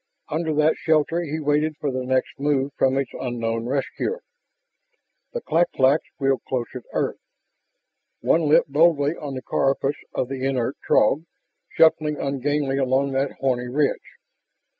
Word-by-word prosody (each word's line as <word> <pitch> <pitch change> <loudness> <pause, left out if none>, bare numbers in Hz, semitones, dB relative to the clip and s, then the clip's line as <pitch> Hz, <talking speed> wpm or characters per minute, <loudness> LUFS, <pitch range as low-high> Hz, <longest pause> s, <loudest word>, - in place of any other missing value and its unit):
Under 160 +1 -1
that 155 +1 +3
shelter 160 +2 +1
he 160 -2 -3
waited 150 +1 0
for 145 - -2
the 130 0 -3
next 130 +1 -1
move 140 -1 +1
from 135 0 +2
his 135 0 +1
unknown 115 -2 -3
rescuer. 140 - -2 1.1
The 485 - -3
clak 175 - +1
claks 135 +4 +3
wheeled 135 -3 +1
closer 125 0 -3
to - - -34
earth. - - -1 1.0
One 160 -2 +2
lit 155 - +5
boldly 150 0 +3
on 145 -4 -6
the 130 - -6
carapace 135 +1 0
of 125 - 0
the 130 0 -5
inert 130 -1 0
Throg, 155 +4 +3 0.4
shuffling 155 -2 +3
ungainly 140 0 -1
along 135 +1 +1
that 135 +1 -1
horny 125 -2 -1
ridge. 140 +3 -1
140 Hz, 145 wpm, -23 LUFS, 130-150 Hz, 1.1 s, lit